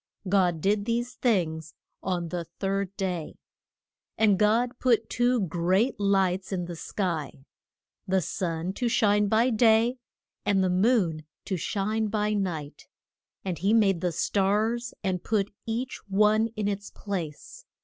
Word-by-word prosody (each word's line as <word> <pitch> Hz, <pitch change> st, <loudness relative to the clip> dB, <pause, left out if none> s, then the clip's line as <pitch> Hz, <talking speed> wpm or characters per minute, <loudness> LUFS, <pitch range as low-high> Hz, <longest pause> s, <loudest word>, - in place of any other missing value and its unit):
God 180 Hz, -4 st, +2 dB
did 200 Hz, +2 st, +1 dB
these 240 Hz, +2 st, -1 dB
things 160 Hz, -10 st, -1 dB, 0.3 s
on 175 Hz, -3 st, -2 dB
the 170 Hz, 0 st, -3 dB
third 195 Hz, 0 st, -2 dB
day. 180 Hz, -5 st, -3 dB, 0.8 s
And 205 Hz, -3 st, +4 dB
God 235 Hz, +4 st, +2 dB
put 230 Hz, -4 st, +2 dB
two 245 Hz, -1 st, +2 dB
great 185 Hz, +7 st, +1 dB
lights 190 Hz, -2 st, +1 dB
in 180 Hz, -2 st, -2 dB
the 170 Hz, 0 st, -6 dB
sky, 160 Hz, -5 st, -3 dB, 0.6 s
the 190 Hz, 0 st, +2 dB
Sun 175 Hz, 0 st, -3 dB
to 245 Hz, -, +2 dB
shine 210 Hz, -2 st, +3 dB
by 225 Hz, +5 st, +3 dB
day, 230 Hz, +2 st, +4 dB, 0.5 s
and 195 Hz, -2 st, +2 dB
the 185 Hz, -, +1 dB
Moon 180 Hz, -6 st, +2 dB, 0.2 s
to 190 Hz, -, -2 dB
shine 215 Hz, +5 st, -1 dB
by 210 Hz, 0 st, 0 dB
night; 170 Hz, -8 st, -3 dB, 0.6 s
and 180 Hz, -5 st, -3 dB
he 200 Hz, +5 st, +3 dB
made 195 Hz, -6 st, +3 dB
the 180 Hz, -, 0 dB
stars, 215 Hz, +7 st, 0 dB
and 185 Hz, -2 st, -1 dB
put 205 Hz, -2 st, 0 dB
each 240 Hz, +3 st, -3 dB
one 210 Hz, +3 st, +3 dB
in 210 Hz, -1 st, -1 dB
its 205 Hz, 0 st, -3 dB
place. 200 Hz, -, -6 dB
200 Hz, 140 wpm, -27 LUFS, 180-220 Hz, 0.8 s, And